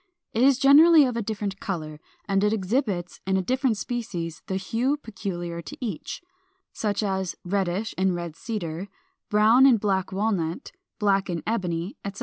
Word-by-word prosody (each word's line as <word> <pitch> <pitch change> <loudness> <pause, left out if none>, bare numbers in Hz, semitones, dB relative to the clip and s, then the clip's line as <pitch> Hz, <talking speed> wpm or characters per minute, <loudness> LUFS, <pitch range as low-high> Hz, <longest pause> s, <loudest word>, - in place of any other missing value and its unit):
It 225 - 0
is 265 0 +5
generally 300 +3 +7
of 250 -2 -2
a 235 - -1
different 205 -2 -4
color, 155 -5 -5 0.3
and 195 0 +1
it 210 - +3
exhibits 195 -3 -1
in 190 0 +2
different 255 +1 +1
species 200 -10 -4
the 190 - -2
hue 230 +9 0
peculiar 185 -9 -5
to 145 - -9
each, 220 - -5 0.5
such 205 -1 -1
as 190 -3 -1
reddish 195 +2 -1
in 190 -1 +2
Red 170 -2 -5
Cedar, 180 -3 -4 0.4
brown 220 +6 +6
in 250 -4 +6
Black 195 -2 0
Walnut, 190 - -1 0.3
black 200 -2 +1
in 170 -2 -3
Ebony, 180 -4 -2
etc. 200 0 -6
200 Hz, 155 wpm, -25 LUFS, 180-230 Hz, 0.5 s, generally